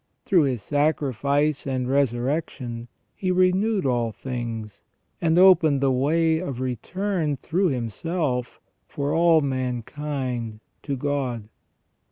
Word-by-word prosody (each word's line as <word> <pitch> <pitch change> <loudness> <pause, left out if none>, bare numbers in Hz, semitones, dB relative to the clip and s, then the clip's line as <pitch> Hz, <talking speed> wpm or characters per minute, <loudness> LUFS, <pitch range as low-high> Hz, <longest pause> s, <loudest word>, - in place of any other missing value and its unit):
Through 175 -7 +4
His 125 -7 -2
sacrifice 145 0 0
and 130 -2 -1
resurrection 125 -2 -1 0.3
He 185 - -3
renewed 185 +2 +2
all 120 -3 +1
things, 115 -4 -6 0.4
and 165 0 +2
opened 170 -6 +6
the 135 -1 +2
way 160 +5 +2
of 140 -8 -5
return 155 - -2
through 185 +8 0
Himself 125 - -2 0.3
for 145 0 -2
all 165 -1 +5
mankind 130 -2 -3 0.2
to 140 -2 -3
God. 130 -6 -2
140 Hz, 110 wpm, -24 LUFS, 125-160 Hz, 0.4 s, opened